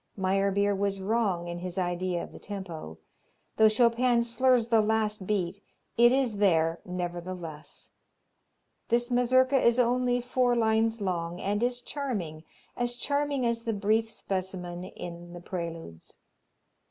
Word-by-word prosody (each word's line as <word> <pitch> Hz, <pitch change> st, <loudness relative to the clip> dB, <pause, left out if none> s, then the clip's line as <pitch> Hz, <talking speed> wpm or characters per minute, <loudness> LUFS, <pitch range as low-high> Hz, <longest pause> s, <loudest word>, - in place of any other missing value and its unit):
Meyerbeer 195 Hz, +1 st, +2 dB
was 195 Hz, 0 st, -1 dB
wrong 195 Hz, -4 st, 0 dB
in 175 Hz, 0 st, -5 dB
his 180 Hz, +1 st, -6 dB
idea 175 Hz, -1 st, -1 dB
of -, -, -10 dB
the -, -, -11 dB
tempo. 175 Hz, -, -7 dB, 0.6 s
Though 220 Hz, 0 st, +7 dB
Chopin 235 Hz, +2 st, +3 dB
slurs 240 Hz, 0 st, +2 dB
the 225 Hz, -1 st, +5 dB
last 215 Hz, -2 st, 0 dB
beat, 200 Hz, -2 st, -1 dB, 0.3 s
it 240 Hz, +1 st, +6 dB
is 255 Hz, -5 st, +1 dB
there, 165 Hz, -4 st, +2 dB
nevertheless. 175 Hz, -3 st, -6 dB, 1.0 s
This 240 Hz, +1 st, +1 dB
Mazurka 255 Hz, +2 st, +3 dB
is 235 Hz, 0 st, +4 dB
only 245 Hz, 0 st, +2 dB
four 245 Hz, 0 st, +1 dB
lines 225 Hz, 0 st, +2 dB
long 175 Hz, -2 st, -2 dB
and 205 Hz, +2 st, -1 dB
is 245 Hz, 0 st, 0 dB
charming, 205 Hz, -, -4 dB, 0.3 s
as 240 Hz, 0 st, -1 dB
charming 285 Hz, 0 st, 0 dB
as 235 Hz, -1 st, 0 dB
the 230 Hz, -1 st, -2 dB
brief 215 Hz, +2 st, +1 dB
specimen 185 Hz, -3 st, -4 dB
in 175 Hz, -1 st, -9 dB
the 175 Hz, -, -8 dB
Preludes. 165 Hz, -, -7 dB
205 Hz, 135 wpm, -28 LUFS, 180-240 Hz, 1.0 s, Though